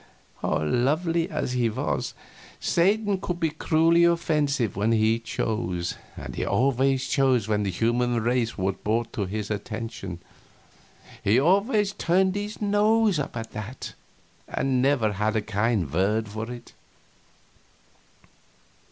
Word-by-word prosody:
Lovely 155 - +1
as 150 -4 -2
he 125 -2 +1
was, 75 - -2 0.4
Satan 200 +3 +2
could 175 -1 -3
be 160 -2 +1
cruelly 165 +2 +3
offensive 150 - +1
when 105 +4 +1
he 110 +1 +3
chose; 90 -6 -2 0.2
and - - -7
he - - -3
always 135 +1 +1
chose 130 -6 +2
when 105 -1 +1
the 100 - -1
human 120 +5 +1
race 120 0 0
was 95 0 0
brought 115 +2 -1
to 100 - -1
his 105 +2 -4
attention. 105 -4 -5 1.0
He 110 +5 +4
always 200 - +3
turned 185 +2 +2
up 205 - -1
his 210 +1 -6
nose 210 -2 +3
at 115 -5 -5
it, 110 +4 -6 0.5
and 130 -2 0
never 125 -6 +2
had 105 +2 0
a 110 - +2
kind 105 - 0
word 105 +5 +1
for 110 +3 -5
it. 120 -1 -10
120 Hz, 130 wpm, -25 LUFS, 110-165 Hz, 1.0 s, He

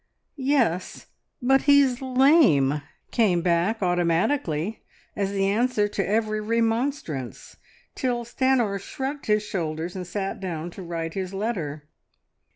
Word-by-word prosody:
"Yes, 260 - 0 0.4
but 270 +2 +4
he's 275 -3 +5
lame!" 255 - +4 0.3
came 185 -8 +2
back 180 +5 +1
automatically 175 - 0 0.3
as 200 -1 -1
the 195 -1 0
answer 210 +1 +1
to 200 -1 -1
every 215 0 0
remonstrance, 225 - -2 0.4
till 240 -2 -2
Stanor 235 -5 +1
shrugged 270 +8 -5
his 210 0 +2
shoulders 170 -3 -3
and 180 -2 -5
sat 195 +1 -3
down 175 -3 -4
to 190 - -10
write 165 -2 -4
his 190 0 -4
letter. 165 -9 -3
205 Hz, 120 wpm, -25 LUFS, 170-245 Hz, 0.4 s, he's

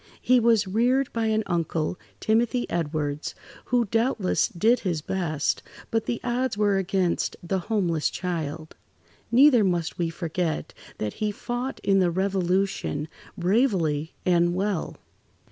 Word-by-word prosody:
He 255 0 +4
was 225 -3 +3
reared 245 +7 +1
by 230 -1 0
an 220 0 +1
uncle, 165 0 -1 0.2
Timothy 235 +2 +1
Edwards, 150 -3 -2 0.3
who 245 -1 +2
doubtless 225 -2 +1
did 225 +8 +2
his 175 -5 -1
best, 160 -6 -1 0.3
but 225 -1 0
the 235 - -1
odds 250 -2 -1
were 205 -2 +3
against 190 -2 0
the 190 +2 -1
homeless 175 -6 0
child. 160 -3 -4 0.6
Neither 250 -1 +6
must 175 -4 -1
we 170 -1 +1
forget 165 0 -3 0.2
that 105 -1 -3
he 215 - +2
fought 245 +5 -4
in 195 -1 +3
the 180 -2 +3
Revolution, 185 -4 0 0.3
bravely 175 - +1
and 175 -1 +3
well. 195 -2 -2
190 Hz, 130 wpm, -25 LUFS, 170-225 Hz, 0.6 s, Neither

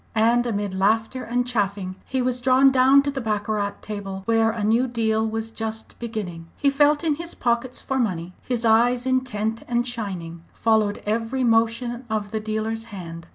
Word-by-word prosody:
And 235 +2 +3
amid 205 -3 -2
laughter 225 +6 +1
and 245 +1 0
chaffing 200 -5 -1
he 260 -1 -1
was 250 0 0
drawn 260 +2 +5
down 265 +2 +5
to 285 - -1
the 270 -1 -4
baccarat 210 -2 -1
table, 195 -2 -5
where 225 -1 +3
a 220 -1 -3
new 230 +5 +3
deal 220 -2 0
was 225 0 -3
just 220 0 -6
beginning. 200 -8 -5
He 280 -1 +2
felt 290 +2 +3
in 320 -2 +2
his 340 +1 -7
pockets 240 +1 -1
for 265 0 -1
money; 180 -6 -2
his 240 -2 -2
eyes, 240 +3 +4
intent 230 -4 -1
and 240 0 +1
shining, 185 -8 -5
followed 220 -2 +1
every 225 +5 -1
motion 235 +1 +1
of 210 -2 -2
the 220 - -1
dealer's 220 +1 -3
hand. 170 -6 -8
225 Hz, 175 wpm, -23 LUFS, 210-245 Hz, -, drawn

